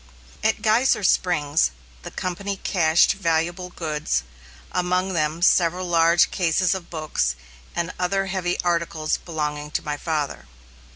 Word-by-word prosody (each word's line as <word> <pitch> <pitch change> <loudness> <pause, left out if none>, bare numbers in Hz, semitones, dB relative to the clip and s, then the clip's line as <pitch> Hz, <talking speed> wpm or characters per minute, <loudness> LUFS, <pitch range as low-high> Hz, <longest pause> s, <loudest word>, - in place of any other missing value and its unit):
At 220 -1 +1
Geyser 220 0 +3
Springs, 160 -5 +2 0.3
the - - -7
company 195 +2 -4
cached 165 -4 +3
valuable 175 0 -1
goods, 150 - -2 0.5
among 180 +1 0
them 155 0 -1
several 180 0 +3
large 170 0 +4
cases 180 +1 +2
of 185 -3 -6
books 155 - -1 0.4
and 170 0 -2
other 195 +2 0
heavy 185 -2 -2
articles 170 -3 0
belonging 150 -3 -4
to - - -2
my 150 -1 -2
father. 145 - -3
170 Hz, 125 wpm, -23 LUFS, 155-185 Hz, 0.5 s, large